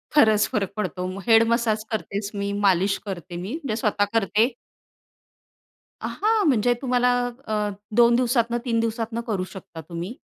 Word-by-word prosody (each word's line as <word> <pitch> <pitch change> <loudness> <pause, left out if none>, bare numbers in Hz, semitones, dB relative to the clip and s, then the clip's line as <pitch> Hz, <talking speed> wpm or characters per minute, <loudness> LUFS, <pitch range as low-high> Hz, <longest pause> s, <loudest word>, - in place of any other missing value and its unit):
खरच 220 -7 +5
फरक 200 -3 -1
पडतो. 185 -2 -3 0.2
हेड 225 0 +7
मसाज 230 -2 +1
करतेच 205 -1 -3
मी, 200 0 -2
मालिश 195 -1 +2
करते, 180 -3 -6
मी 180 +4 -5
म्हणजे 225 -6 -2
स्वतः 210 -2 +1
करते. 225 +3 +2 1.5
अ, - - -3
हां, 430 -1 +1
म्हणजे 245 -3 +3
तुम्हाला 250 -1 +2 0.4
अ, 215 - -2 0.5
2 235 0 +6
दिवसातनं, 240 -1 +1
3 230 -2 +1
दिवसातनं 225 0 -2
करू 200 -5 -1
शकता 170 -4 -9
तुम्ही. 175 +7 -5
220 Hz, 145 wpm, -24 LUFS, 200-235 Hz, 1.5 s, हेड